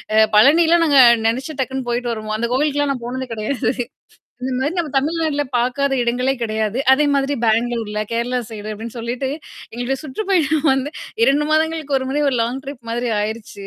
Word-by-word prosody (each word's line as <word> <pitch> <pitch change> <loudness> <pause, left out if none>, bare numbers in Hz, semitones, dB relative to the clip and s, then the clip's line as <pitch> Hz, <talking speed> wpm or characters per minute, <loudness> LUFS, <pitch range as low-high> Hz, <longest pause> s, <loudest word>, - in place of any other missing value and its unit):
அ 220 - +7
பழனிலாம் 330 +7 +5
நாங்க 285 -3 +5 0.3
நெனச்சு 260 +7 -1
டக்குன்னு 260 -1 -3
போயிட்டு 240 0 -1
வருவோம். 215 -1 -4
அந்த 235 +1 -2
கோவிலுக்குலாம் 290 +1 +1
நான் 245 -3 -7
போனது 260 +1 -4
கிடையாது. 220 +4 -1 0.7
இந்தமாரி 260 +5 -1
நம்ம 320 -4 -1
தமிழ்நாட்ல 310 0 0 0.2
பார்க்காத 270 +3 0
இடங்களே 250 +3 0
கிடையாது. 220 +1 -1
அதே 295 +3 +4
மாதிரி 275 +1 +1
பெங்களூர்ல, 225 -1 0
கேரளா 240 +2 -1
சைடு 215 -1 -7
அப்பிடின்னு 230 +3 -7
சொல்லிட்டு 245 +3 -3 0.4
எங்களுடைய 245 +3 -2
சுற்றுப்பயணம் 315 -2 0
வந்து 270 +2 -2 0.3
2 290 +2 +2
மாதங்களுக்கு 315 -3 +1
ஒரு 260 - -5
முறை 295 +2 0
ஒரு 250 - -1
லாங் 250 +4 -3
ட்ரிப் 260 -4 -9
மாதிரி 240 0 -1
ஆயிருச்சு. 210 -2 -5
260 Hz, 165 wpm, -19 LUFS, 235-290 Hz, 0.7 s, அ